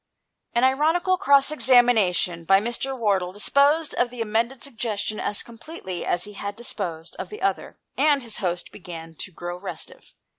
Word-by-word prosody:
An 235 Hz, -, +2 dB
ironical 320 Hz, +8 st, +3 dB
cross 280 Hz, -2 st, +4 dB
examination 230 Hz, -, +3 dB
by 195 Hz, +3 st, +5 dB
Mr. 240 Hz, +5 st, -3 dB
Wardle 195 Hz, -6 st, +1 dB
disposed 280 Hz, -, +2 dB
of 245 Hz, -, +1 dB
the 245 Hz, 0 st, -10 dB
amended 230 Hz, +4 st, -1 dB
suggestion 220 Hz, -5 st, -3 dB
as 205 Hz, -, -1 dB
completely 230 Hz, -, -7 dB
as 175 Hz, -, +1 dB
he 210 Hz, -, -8 dB
had 200 Hz, 0 st, -5 dB
disposed 180 Hz, -8 st, -5 dB
of -, -, -5 dB
the 425 Hz, -2 st, -8 dB
other, 390 Hz, -, -1 dB, 0.2 s
and 290 Hz, -3 st, +4 dB
his 230 Hz, -3 st, -5 dB
host 180 Hz, -3 st, -2 dB
began 165 Hz, -3 st, -9 dB
to -, -, -6 dB
grow 175 Hz, +1 st, -6 dB
restive. 185 Hz, +2 st, -8 dB
225 Hz, 160 wpm, -24 LUFS, 185-270 Hz, 0.2 s, by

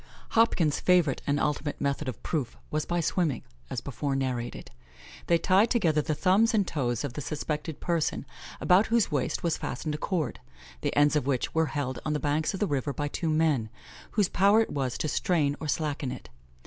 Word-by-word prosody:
Hopkins' 180 Hz, -10 st, +3 dB
favourite 175 Hz, -7 st, +3 dB
and 145 Hz, 0 st, +2 dB
ultimate 145 Hz, 0 st, -1 dB
method 140 Hz, +1 st, -1 dB
of 125 Hz, -, -8 dB
proof 145 Hz, -8 st, -2 dB
was 155 Hz, 0 st, -1 dB
by 175 Hz, 0 st, 0 dB
swimming, 160 Hz, -4 st, 0 dB, 0.3 s
as 120 Hz, -, -3 dB
before 140 Hz, +1 st, -3 dB
narrated. 125 Hz, -3 st, -3 dB, 0.6 s
They 170 Hz, -, +5 dB
tied 195 Hz, +6 st, +3 dB
together 165 Hz, -11 st, +2 dB
the 155 Hz, +1 st, -2 dB
thumbs 195 Hz, +9 st, +3 dB
and 200 Hz, -4 st, +2 dB
toes 120 Hz, -5 st, -1 dB
of 140 Hz, -4 st, -4 dB
the 150 Hz, -, -5 dB
suspected 150 Hz, +1 st, -4 dB
person, 170 Hz, -3 st, -1 dB, 0.3 s
about 185 Hz, +4 st, +4 dB
whose 230 Hz, -1 st, +2 dB
waist 145 Hz, -, -1 dB
was 170 Hz, -2 st, +1 dB
fastened 150 Hz, +4 st, -3 dB
a 150 Hz, -, -4 dB
cord, 170 Hz, -8 st, -2 dB, 0.4 s
the -, -, -1 dB
ends 145 Hz, +1 st, +5 dB
of 140 Hz, -3 st, +1 dB
which 130 Hz, -3 st, 0 dB
were 160 Hz, -1 st, +2 dB
held 135 Hz, -3 st, -3 dB
on 155 Hz, -, -1 dB
the 150 Hz, -, 0 dB
banks 150 Hz, +2 st, 0 dB
of -, -, -5 dB
the -, -, +2 dB
river 145 Hz, -3 st, -1 dB
by 145 Hz, 0 st, -2 dB
two 165 Hz, +2 st, -2 dB
men, 155 Hz, -8 st, +2 dB, 0.4 s
whose 205 Hz, -4 st, +3 dB
power 200 Hz, +5 st, +4 dB
it 225 Hz, -, -2 dB
was 135 Hz, -4 st, -1 dB
to -, -, -1 dB
strain 150 Hz, -2 st, +1 dB
or 155 Hz, -, -4 dB
slacken 145 Hz, -3 st, -1 dB
it. -, -, -8 dB
150 Hz, 200 wpm, -28 LUFS, 140-175 Hz, 0.6 s, They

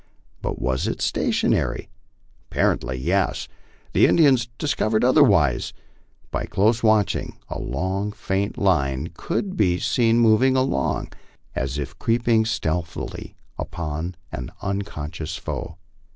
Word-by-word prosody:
But -, -, -3 dB
was 65 Hz, 0 st, 0 dB
it -, -, -2 dB
stationary? -, -, 0 dB, 0.6 s
Apparently, 65 Hz, -1 st, 0 dB
yes. 90 Hz, +8 st, 0 dB, 0.5 s
The -, -, +6 dB
Indians 135 Hz, -8 st, +4 dB
discovered 115 Hz, -7 st, +1 dB
otherwise. 110 Hz, -, +4 dB, 0.6 s
By -, -, -2 dB
close 110 Hz, +4 st, +2 dB
watching, 110 Hz, -3 st, +2 dB
the -, -, -5 dB
long 95 Hz, +3 st, -2 dB
faint 100 Hz, 0 st, -2 dB
line 75 Hz, -5 st, +1 dB
could 190 Hz, +3 st, -3 dB
be 90 Hz, -5 st, +2 dB
seen 115 Hz, +3 st, +2 dB
moving 120 Hz, +3 st, +5 dB
along, 130 Hz, -, 0 dB, 0.4 s
as 65 Hz, +2 st, -2 dB
if 70 Hz, -2 st, -5 dB
creeping 115 Hz, -1 st, +2 dB
stealthily 85 Hz, -6 st, -3 dB, 0.2 s
upon 85 Hz, +2 st, -4 dB, 0.2 s
an 60 Hz, 0 st, -5 dB
unconscious 85 Hz, -5 st, -4 dB
foe. 85 Hz, -1 st, -5 dB
100 Hz, 110 wpm, -23 LUFS, 80-115 Hz, 0.6 s, The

